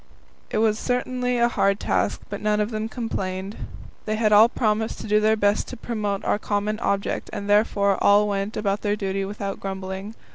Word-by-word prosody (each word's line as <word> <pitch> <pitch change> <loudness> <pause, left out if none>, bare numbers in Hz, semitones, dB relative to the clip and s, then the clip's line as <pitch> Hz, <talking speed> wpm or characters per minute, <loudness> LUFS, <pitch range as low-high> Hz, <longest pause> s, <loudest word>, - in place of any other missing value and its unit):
It - - -2
was 215 0 +2
certainly 250 0 -1
a 235 0 +4
hard 200 -3 +1
task, - - 0
but - - -6
none 210 0 +1
of 210 +2 0
them 215 0 -3
complained. 195 -4 -4 0.5
They 215 - -1
had 215 -1 +2
all 215 +3 +8
promised 220 -1 -1
to - - -7
do 210 0 +4
their 215 +1 +3
best 205 -1 +1
to 255 - -8
promote 210 -4 -3
our - - +1
common 210 +1 -1
object, 200 -4 -1
and 200 - -5
therefore 205 -2 +2
all 205 +1 +5
went 200 +1 -2
about 205 -1 -1
their 205 -1 0
duty 195 -1 -2
without 200 0 -5
grumbling. 190 +2 -5
210 Hz, 190 wpm, -24 LUFS, 200-220 Hz, 0.5 s, all